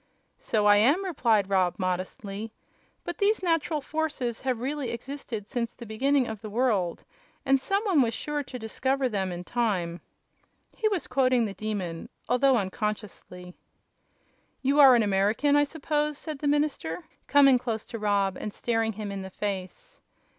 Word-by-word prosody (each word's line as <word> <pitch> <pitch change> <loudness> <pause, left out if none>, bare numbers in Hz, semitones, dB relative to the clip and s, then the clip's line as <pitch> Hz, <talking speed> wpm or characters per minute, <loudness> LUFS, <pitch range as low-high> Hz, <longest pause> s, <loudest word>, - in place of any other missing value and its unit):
"So 210 -2 0
I 205 0 +7
am," 285 - +3
replied 230 - +2
Rob, 185 -3 +2
modestly; 195 +3 -4 0.5
"but - - -6
these 410 -1 +2
natural 330 -3 +1
forces 285 -6 -3
have 255 -3 -1
really 275 +1 -3
existed 235 -3 -6
since 235 -1 -3
the 235 - -10
beginning 265 +5 +1
of 220 -3 -6
the 215 - -7
world, 210 -7 0 0.4
and 270 0 +3
some 395 +9 0
one 375 -9 +3
was 230 -2 +1
sure 295 -1 -3
to 255 -2 -8
discover 260 +4 -1
them 195 -5 -2
in 175 0 -5
time." 180 -7 -1 0.7
He 440 - +1
was 400 -5 -1
quoting 255 -2 +2
the 200 - -4
Demon, 195 -6 -4 0.2
although 250 +2 +4
unconsciously. 195 -3 -4 1.1
"You 280 +3 +2
are 270 -3 +9
an 235 - +4
American, 210 +8 +2
I 290 0 +5
suppose," 300 0 -2
said 305 -3 -6
the 290 - -2
minister, 285 - 0 0.2
coming 275 -2 +6
close 230 -3 -3
to 230 - -7
Rob 200 -2 +1
and 210 - -5
staring 225 0 -1
him 205 -1 -5
in 195 -1 -4
the 190 - -7
face. 205 - -5
235 Hz, 160 wpm, -27 LUFS, 205-280 Hz, 1.1 s, are